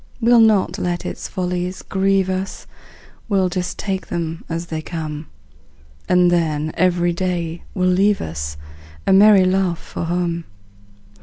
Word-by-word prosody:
We'll 240 Hz, 0 st, +5 dB
not 215 Hz, -4 st, +3 dB
let 175 Hz, -1 st, -2 dB
its -, -, -5 dB
follies 180 Hz, 0 st, -3 dB
grieve 195 Hz, 0 st, +1 dB
us, 190 Hz, +1 st, -4 dB, 0.6 s
We'll 190 Hz, -3 st, +2 dB
just 180 Hz, 0 st, -3 dB
take 190 Hz, -2 st, -3 dB
them 165 Hz, -1 st, -4 dB
as 165 Hz, +1 st, -3 dB
they 160 Hz, -2 st, -4 dB
come; 155 Hz, -2 st, -5 dB, 0.8 s
And 180 Hz, -1 st, +4 dB
then 155 Hz, -3 st, 0 dB
every 175 Hz, -1 st, +2 dB
day 170 Hz, -2 st, -2 dB
will 185 Hz, -2 st, +1 dB
leave 195 Hz, +3 st, +3 dB
us 75 Hz, -2 st, -5 dB, 0.5 s
A -, -, +4 dB
merry 200 Hz, -1 st, +7 dB
laugh 185 Hz, -2 st, +1 dB
for 165 Hz, -, -6 dB
home. 170 Hz, -1 st, -1 dB
180 Hz, 140 wpm, -20 LUFS, 170-190 Hz, 0.8 s, merry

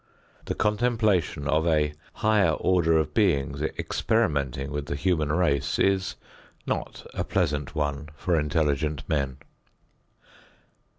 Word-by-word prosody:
The -, -, -3 dB
contemplation 105 Hz, -, +1 dB
of 80 Hz, +2 st, +2 dB
a 75 Hz, -2 st, +2 dB, 0.2 s
higher 110 Hz, -3 st, +3 dB
order 85 Hz, -3 st, +2 dB
of 75 Hz, -1 st, 0 dB
beings 70 Hz, -10 st, +1 dB
experimenting 70 Hz, -, -1 dB
with 75 Hz, 0 st, -4 dB
the 70 Hz, -, -2 dB
human 75 Hz, 0 st, 0 dB
race 75 Hz, -5 st, +1 dB
is 95 Hz, -1 st, +1 dB, 0.5 s
not -, -, -4 dB
a -, -, -1 dB
pleasant 75 Hz, -2 st, -1 dB
one 75 Hz, 0 st, -2 dB
for 85 Hz, +4 st, 0 dB
intelligent 75 Hz, -1 st, 0 dB
men. 70 Hz, -5 st, -1 dB
75 Hz, 115 wpm, -26 LUFS, 70-95 Hz, 0.5 s, higher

